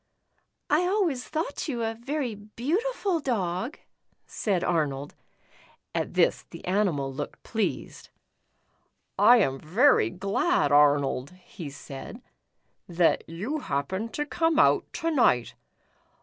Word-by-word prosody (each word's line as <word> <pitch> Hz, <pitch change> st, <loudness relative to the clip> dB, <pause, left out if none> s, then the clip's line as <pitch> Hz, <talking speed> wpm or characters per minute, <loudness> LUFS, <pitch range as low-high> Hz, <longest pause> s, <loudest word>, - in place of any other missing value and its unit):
*' -, -, -45 dB, 0.3 s
I 330 Hz, +4 st, +3 dB
always 360 Hz, -10 st, 0 dB
thought 310 Hz, -1 st, -3 dB
you 240 Hz, -6 st, -2 dB
a 225 Hz, 0 st, -1 dB
very 255 Hz, +2 st, -3 dB
beautiful 330 Hz, -, -2 dB
dog," 225 Hz, -, -2 dB, 0.5 s
said 190 Hz, -5 st, -1 dB
Arnold. 145 Hz, -5 st, -1 dB, 0.8 s
At -, -, -2 dB
this -, -, +2 dB
the -, -, -11 dB
animal 175 Hz, -8 st, 0 dB
looked 145 Hz, +2 st, -6 dB
pleased. 220 Hz, -2 st, -3 dB, 0.6 s
" -, -, -43 dB, 0.3 s
I 235 Hz, +4 st, +8 dB
am 135 Hz, -, +1 dB
very 180 Hz, -, +3 dB
glad, 180 Hz, -, 0 dB
Arnold," 145 Hz, -1 st, +3 dB
he 180 Hz, -3 st, -10 dB
said, 145 Hz, -, -9 dB, 0.7 s
"that 170 Hz, -1 st, +2 dB
you 210 Hz, -, -3 dB
happened 190 Hz, -, -3 dB
to 295 Hz, -, -1 dB
come 325 Hz, +1 st, 0 dB
out 320 Hz, -, +3 dB
to 330 Hz, 0 st, -1 dB
night. 180 Hz, -, +3 dB
210 Hz, 120 wpm, -27 LUFS, -, 0.8 s, I